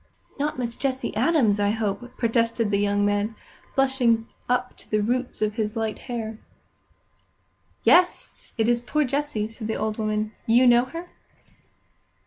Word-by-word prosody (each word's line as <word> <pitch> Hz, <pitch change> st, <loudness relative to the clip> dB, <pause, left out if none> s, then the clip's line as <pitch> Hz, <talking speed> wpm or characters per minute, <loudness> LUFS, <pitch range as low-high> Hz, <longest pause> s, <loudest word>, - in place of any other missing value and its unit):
"Not 295 Hz, -1 st, -1 dB
Miss 235 Hz, -2 st, -3 dB
Jessie 265 Hz, -4 st, -2 dB
Adams, 230 Hz, -4 st, +3 dB
I 205 Hz, 0 st, +2 dB
hope!" 225 Hz, +3 st, -3 dB
protested 230 Hz, -2 st, +1 dB
the 200 Hz, -, +2 dB
young 205 Hz, 0 st, +2 dB
man, 205 Hz, +2 st, 0 dB, 0.4 s
blushing 250 Hz, -4 st, +2 dB, 0.2 s
up 250 Hz, 0 st, 0 dB
to -, -, -17 dB
the 215 Hz, -, +2 dB
roots 245 Hz, +2 st, -1 dB
of 210 Hz, +1 st, -1 dB
his 210 Hz, -2 st, -1 dB
light 220 Hz, -2 st, -2 dB
hair. 225 Hz, -2 st, -4 dB, 1.4 s
"Yes, 355 Hz, +1 st, +4 dB, 0.2 s
it 225 Hz, -1 st, +2 dB
is 240 Hz, 0 st, +2 dB
poor 300 Hz, +5 st, 0 dB
Jessie," 275 Hz, -5 st, -1 dB
said 225 Hz, 0 st, -7 dB
the 220 Hz, -, -1 dB
old 215 Hz, +1 st, -2 dB
woman. 215 Hz, 0 st, -1 dB, 0.2 s
"You 240 Hz, +3 st, +5 dB
know 240 Hz, 0 st, +6 dB
her?" 335 Hz, +7 st, -8 dB
230 Hz, 150 wpm, -25 LUFS, 215-255 Hz, 1.4 s, know